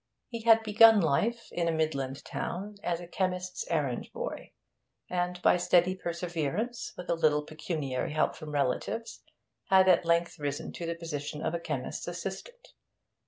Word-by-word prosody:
He 230 -2 -5
had 225 0 +6
begun 220 0 +7
life, 210 +9 0
in 170 -1 -1
a - - +2
midland 140 -4 -2
town, 200 +4 -4
as 175 -3 -1
a 175 - -8
chemist's 180 0 -2
errand 145 -7 -1
boy, - - -5 0.6
and 180 0 -1
by - - +5
steady 180 +1 +3
perseverance, 175 - -3
with 180 - -7
a - - +2
little 150 -3 +2
pecuniary 150 -4 -3
help 155 - +1
from 155 -1 -8
relatives, 150 - -2 0.4
had 190 -1 +5
at 180 -2 +5
length 170 0 +1
risen 145 -1 -3
to 170 - -5
the 170 - -2
position 150 -3 -5
of 170 - 0
chemist's 145 -6 -4
assistant. 195 - -6
170 Hz, 155 wpm, -30 LUFS, 155-190 Hz, 0.6 s, begun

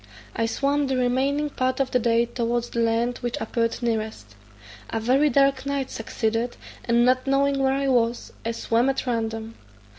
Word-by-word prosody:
I 225 - 0
swam 280 +4 0
the 265 -1 0
remaining 270 +4 +1
part 255 0 -1
of 270 -1 0
the 250 - +3
day 235 0 +2
towards 240 0 -2
that 235 - -2
land 230 +2 +1
which 240 -1 -3
appeared 230 +1 -1
nearest. 220 - -3 0.6
A 225 - -2
very 265 +6 +3
dark 275 -1 +3
night 280 -1 -2
succeeded, 225 +1 -2 0.3
and 235 0 +3
not 255 +1 +2
knowing 275 0 +2
where 265 0 +2
I 275 0 0
was, 240 -2 +1
I 230 - -1
swam 230 +2 +1
at 270 0 -1
random. 225 -2 -2
245 Hz, 175 wpm, -24 LUFS, 230-270 Hz, 0.6 s, the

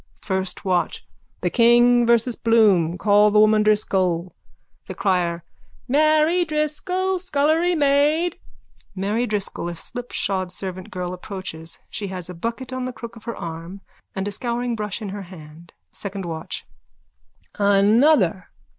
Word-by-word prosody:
FIRST 190 -1 -2
WATCH: 180 -2 0 0.4
The - - 0
King 240 0 +5
versus 235 0 +3
Bloom. 200 -7 +3
Call 205 +3 +4
the 210 0 +3
woman 215 0 +5
Driscoll. 185 -5 +1 0.5
THE - - -6
CRIER: 175 -4 0 0.4
Mary 310 +5 +3
Driscoll, 360 +5 -1
scullerymaid! 315 0 +2 0.6
_(Mary 210 +5 -1
Driscoll, 200 -4 -2
a 170 - -6
slipshod 195 -3 -3
servant 185 0 -6
girl, 180 -1 -4
approaches. 180 -4 -7
She 205 - -3
has 185 -2 -6
a - - -7
bucket 230 +8 -5
on 255 0 -3
the 255 - -4
crook 235 0 -9
of 225 - -14
her 235 - -4
arm 170 +2 -7 0.3
and 190 +1 -2
a - - -2
scouringbrush 235 -3 -2
in 205 - -4
her 200 +1 -6
hand.)_ 165 -1 -13 0.2
SECOND 195 -2 -5
WATCH: 160 -1 -5 0.9
Another! 205 - +4
210 Hz, 130 wpm, -22 LUFS, 185-245 Hz, 0.9 s, King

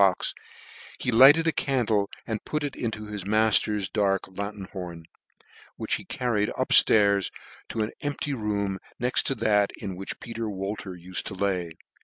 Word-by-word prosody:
box, 95 -2 +3 0.6
he 125 - -1
lighted 135 +8 +7
a 165 - +3
candle, 115 -9 0 0.2
and 110 -2 -4
put 150 -1 -2
it 145 -2 -3
into 110 -2 -4
his 105 -2 -5
mailer's 105 -1 +2
dark 95 0 +1
lanthorn, 95 -4 -7 0.7
which - - -3
he - - -1
carried 110 -4 0
up - - -1
flairs, 100 -3 +5 0.4
to 110 - -1
an 105 - -4
empty 145 0 -2
room 100 -4 -2 0.2
next 125 +1 +1
to 135 - 0
that 105 -4 +2
in 95 -2 -5
which 95 +2 -6
Peter 115 -1 -5
Wolter 95 -1 -5
ufed 90 +1 -3
to 95 - -6
lay. 90 -4 -1
105 Hz, 160 wpm, -26 LUFS, 95-115 Hz, 0.7 s, lighted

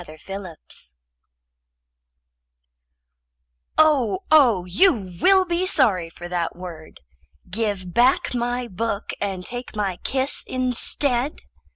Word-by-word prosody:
[Pg - - -21
199] 190 +2 -8 0.2
VII 65 0 -12 2.8
Oh, 310 +1 +3
oh, 240 - +5
you 195 - +2
will 380 -1 +5
be 350 +1 -1
sorry 200 - +3
for 175 +1 -10
that 175 -1 -2
word! 170 - -10 0.5
Give 195 -4 -3
back 250 +5 +3
my 245 0 -2
book 205 +1 -3
and 190 -3 -3
take 245 -1 -8
my 195 -4 -2
kiss 265 +6 -1
instead. 255 +1 0
225 Hz, 105 wpm, -22 LUFS, 180-260 Hz, 2.8 s, oh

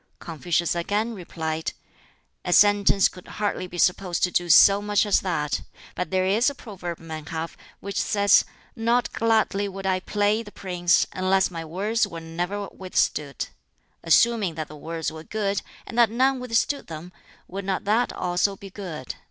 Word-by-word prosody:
Confucius 170 +1 -1
again 205 +7 -1
replied, 160 -4 -4 0.7
"A 180 - -2
sentence 205 -1 +5
could 180 - -13
hardly 205 -3 -1
be 175 - -9
supposed 180 0 +1
to 180 - +3
do 175 0 0
so 195 +5 +7
much 205 0 +2
as 205 - +3
that. 150 -6 -1 0.3
But 180 - -3
there 185 -1 +1
is 215 +8 +3
a 285 - -8
proverb 185 -8 -7
men 160 -2 -8
have 165 +1 -4 0.3
which 200 0 -2
says, 200 -1 +4 0.3
'Not 235 +2 +1
gladly 220 -3 +1
would 195 0 -7
I 190 -1 +1
play 205 +3 +1
the 205 -2 -11
prince, 180 -3 +1
unless 190 0 +2
my 165 -2 -5
words 205 +7 0
were 170 -4 -7
ne'er 175 +5 -4
withstood.' 150 -6 -1 0.5
Assuming 195 +2 +3
that 155 -1 -5
the 150 - -10
words 160 +2 -4
were 160 0 -9
good, 200 0 -1 0.2
and 240 - -3
that 235 -2 +6
none 260 +3 +2
withstood 250 +3 0
them, 165 +2 -8 0.4
would 195 +2 -6
not 190 -1 -1
that 220 +4 +2
also 180 +3 0
be 195 0 -11
good? 170 -10 -6
190 Hz, 170 wpm, -25 LUFS, 170-205 Hz, 0.7 s, so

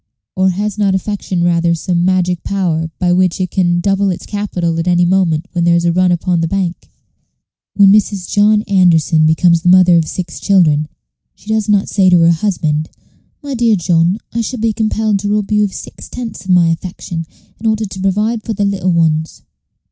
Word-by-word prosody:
or 190 0 +2
has 205 +3 -3
not 200 -2 +1
affection 190 -2 -3
rather 170 -1 +1
some 175 +1 -1
magic 180 -1 0
power 170 -5 -2
by 175 -1 +1
which 185 0 +1
it 185 -2 -2
can 175 -2 +1
double 195 +1 0
its 180 - -5
capital 180 -5 -3
at 165 - -3
any 175 0 +3
moment 175 -2 0
when 175 -1 -1
there 170 0 +3
is 170 0 0
a 170 - +2
run 185 0 +2
upon 175 0 0
the 165 - 0
bank? 180 -1 -3 0.9
When 200 -1 +6
Mrs. 200 -3 +1
John 210 +1 +2
Anderson 165 -5 +2
becomes 170 +1 +3
the 175 - +1
mother 180 -1 +5
of 160 -1 0
six 175 -3 -6
children, 155 -7 +2 0.5
she 210 - -16
does 220 -1 -1
not 205 -1 +2
say 190 -3 +2
to 180 - +5
her 165 0 +5
husband, 160 -4 -1 0.5
"My 285 -1 -5
dear 230 -3 +2
John, 175 0 +1 0.2
I 235 - -1
shall 245 +2 -5
be 225 0 0
compelled 215 -1 -1
to 205 +1 -3
rob 210 0 -1
you 210 0 +2
of 205 - -1
six - - -10
tenths 225 -7 -7
of - - -11
my 175 -2 +4
affection 165 -1 -5 0.3
in 225 - -3
order 220 0 0
to 190 -1 -8
provide 210 +4 0
for 225 - -4
the 205 0 -1
little 190 -2 -1
ones." 160 -2 -1
185 Hz, 200 wpm, -15 LUFS, 170-205 Hz, 0.9 s, When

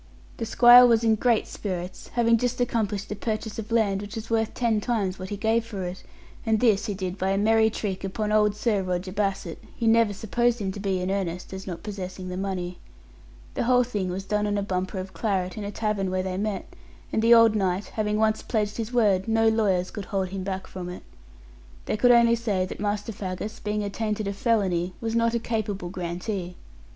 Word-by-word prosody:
The 230 - -3
squire 245 +2 +8
was 230 -1 +3
in 225 -1 +4
great 225 +1 +2
spirits, 185 -2 -5
having 230 -1 +4
just 245 +1 -1
accomplished 215 -5 -1
a - - -2
purchase 220 +1 -3
of 220 +1 -7
land 205 -4 +2
which 205 0 -8
was 225 0 -6
worth 225 -1 0
ten 230 -3 +1
times 200 -6 -1
what 185 0 -6
he 205 - -4
gave 225 +2 +1
for 210 -5 -6
it; 180 +1 -5 0.4
and 220 -2 +2
this 225 -2 +3
he 205 - -2
did 185 0 -4
by 190 - 0
a 195 - +1
merry 220 +2 +4
trick 195 -3 -4
upon 210 +2 -2
old 210 -1 +3
Sir 210 -2 +1
Roger 185 0 -3
Bassett, 195 -4 -2 0.2
who 235 - -1
never 225 -1 +4
supposed 235 +4 0
him 200 -4 -2
to 200 - -7
be 195 -2 -1
in 185 +1 -1
earnest, 185 -2 -3
as 190 0 -7
not 175 -3 -6
possessing 185 -3 -6
the 180 - -4
money. 185 -2 -3 0.7
The - - -1
whole 250 0 +4
thing 205 -6 -3
was 185 +2 -4
done 210 +1 0
on 205 0 0
a 200 - 0
bumper 185 0 -2
of 190 0 -6
claret 185 -5 -1
in 215 - -5
a 200 - -4
tavern 210 -3 -1
where 185 0 -1
they 185 -1 -3
met; 205 +1 -2 0.5
and 220 - +2
the 230 +1 +7
old 230 -1 +6
knight 190 -1 0
having 210 -1 -1
once 220 0 +2
pledged 210 -3 -1
his 230 0 -3
word, 205 -6 +2
no 225 0 +3
lawyers 195 -5 +1
could 205 -3 -6
hold 190 -2 -2
him 190 0 -5
back 190 0 -4
from 180 -1 -7
it. 180 - -8 0.8
They - - -1
could 245 +4 +3
only 235 -1 +6
say 210 -5 0
that - - -8
Master 205 +1 -2
Faggus, 205 +2 -5
being 210 0 -1
attainted 210 0 -2
of 200 - -3
felony, 190 -6 0
was 225 -1 -3
not 230 0 +2
a - - +1
capable 210 -6 -3
grantee. 180 +1 -4
205 Hz, 220 wpm, -26 LUFS, 190-225 Hz, 0.8 s, squire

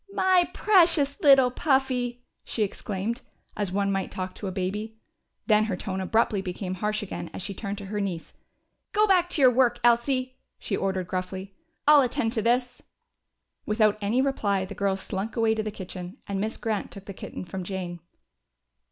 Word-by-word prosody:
"My 370 -2 +4
precious 335 -8 +4
little 270 -3 +6
Puffy!" 255 -3 0 0.2
she 220 - -1
exclaimed, 210 +3 -3 0.3
as 205 -3 -2
one 200 +1 +1
might 195 -1 -1
talk 185 0 -5
to 205 - -6
a - - -2
baby. 210 +4 -3 0.5
Then 215 -1 +4
her 195 -4 -2
tone 190 -1 -4
abruptly 210 0 +1
became 185 0 -4
harsh 210 +3 -2
again 200 - -6
as - - -5
she 200 - -4
turned 200 +1 -5
to 200 - -7
her 205 +1 -3
niece. 180 -5 -4 0.6
"Go 425 +1 +4
back 365 -3 +3
to 330 - -1
your 255 - +8
work, 240 -1 +3
Elsie!" 255 +2 +2 0.2
she 200 - -3
ordered 190 -2 -1
gruffly. 190 +1 -4 0.3
"I'll 300 -1 +8
attend 235 -3 0
to 225 - 0
this!" 245 +2 0 0.9
Without 215 -1 +3
any 225 +6 +2
reply 200 -8 0
the 195 - -8
girl 195 -1 0
slunk 195 +3 -4
away 225 -1 +3
to 220 - -1
the 215 - -3
kitchen, 185 0 -8
and 195 -1 -2
Miss 220 +2 -2
Grant 220 -3 -2
took 195 -1 -11
the 200 - -7
kitten 185 - -7
from 185 +2 -5
Jane. 180 -2 -5
215 Hz, 180 wpm, -26 LUFS, 190-250 Hz, 0.9 s, your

